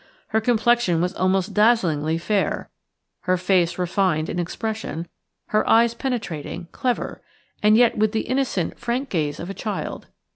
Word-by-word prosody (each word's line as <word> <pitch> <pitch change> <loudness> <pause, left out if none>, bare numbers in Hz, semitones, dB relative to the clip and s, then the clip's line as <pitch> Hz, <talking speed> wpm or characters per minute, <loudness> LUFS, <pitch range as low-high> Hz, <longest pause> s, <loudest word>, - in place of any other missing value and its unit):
Her 220 0 +1
complexion 235 -5 +2
was 180 +2 0
almost 190 +2 0
dazzlingly 170 -9 +3
fair, 200 +4 -1 0.6
her 185 - +4
face 180 -1 +2
refined 180 -3 0
in 180 - -2
expression, 180 -2 -4 0.4
her 215 - +1
eyes 230 +1 +5
penetrating, 220 - -4
clever, 250 -2 -2 0.4
and 210 +1 +5
yet 235 -2 +4
with 215 0 +3
the 220 - 0
innocent, 255 -10 -1
frank 255 +3 -2
gaze 150 -4 -1
of 175 - -5
a - - -5
child. 210 +1 -5
200 Hz, 145 wpm, -23 LUFS, 175-230 Hz, 0.6 s, eyes